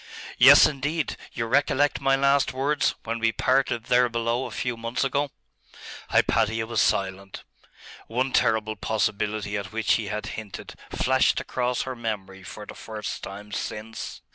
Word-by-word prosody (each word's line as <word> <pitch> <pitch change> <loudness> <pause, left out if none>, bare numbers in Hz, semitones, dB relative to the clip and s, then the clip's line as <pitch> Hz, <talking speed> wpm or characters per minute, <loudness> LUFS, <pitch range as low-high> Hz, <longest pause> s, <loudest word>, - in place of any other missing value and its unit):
'Yes, - - +9
indeed. 150 +2 -1 0.2
You 115 - -3
recollect 140 +3 +2
my 135 0 +3
last 140 0 +2
words, 140 +3 +1
when 115 +1 -3
we 115 0 +2
parted 130 -1 +1
there 125 0 +3
below 115 +2 -1
a - - -8
few 125 -1 -3
months 115 +3 -2
ago?' 140 +1 0 0.8
Hypatia 110 +1 +2
was 115 -1 0
silent. 95 0 -1 0.6
One 130 +4 -1
terrible 110 -1 +2
possibility 105 -1 -1
at 100 -2 -6
which 110 -1 +1
he 110 -3 0
had 105 +2 -4 0.2
hinted 105 -3 -10 0.2
flashed 130 0 +2
across 125 -1 -1
her 130 -1 -5
memory 100 -5 -5
for 105 +3 -9
the - - -9
first 110 -2 -6
time 105 +1 -9
since 110 +2 -6
115 Hz, 150 wpm, -25 LUFS, 105-130 Hz, 0.8 s, Yes